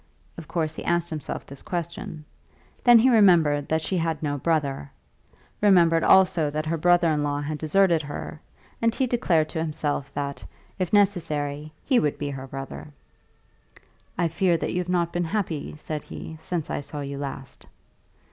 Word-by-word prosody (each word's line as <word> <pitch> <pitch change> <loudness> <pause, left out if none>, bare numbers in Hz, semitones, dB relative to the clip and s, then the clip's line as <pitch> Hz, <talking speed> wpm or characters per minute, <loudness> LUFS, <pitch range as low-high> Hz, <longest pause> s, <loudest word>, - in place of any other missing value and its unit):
Of 165 -3 -10
course 160 -3 -2
he - - -7
asked 170 0 0
himself 155 -2 -5
this 140 0 -11
question. 170 -4 -5 0.6
Then 240 -1 +8
he 230 +3 +5
remembered 165 - +4
that 160 0 +1
she 185 - -1
had 165 -2 -2
no 145 -1 -1
brother, 140 - -1 0.7
remembered 170 -5 +5
also 180 -5 +5
that 155 +1 -3
her 160 +2 -1
brother 175 +1 +3
in 150 -1 0
law 145 0 -1
had 150 +1 -4
deserted 170 +1 +3
her, 145 +1 -7 0.4
and 230 0 +2
he 265 - +1
declared 175 -11 +1
to 160 - -3
himself 150 -3 -2
that, 140 -1 -4 0.4
if 185 -3 -1
necessary, 155 -7 +1
he 255 -3 +4
would 150 - 0
be 145 -1 -3
her 135 -1 -7
brother. 130 - -7 1.3
"I 170 -1 +2
fear 170 +1 +1
that - - -3
you 180 - 0
have 180 0 -4
not 170 -2 0
been 175 0 0
happy," 165 -6 -3
said 155 0 -5
he, 160 - -8
"since 165 -1 -4
I - - -2
saw 145 +1 -6
you 140 0 -5
last." 135 -2 -7
160 Hz, 175 wpm, -25 LUFS, 145-175 Hz, 1.3 s, Then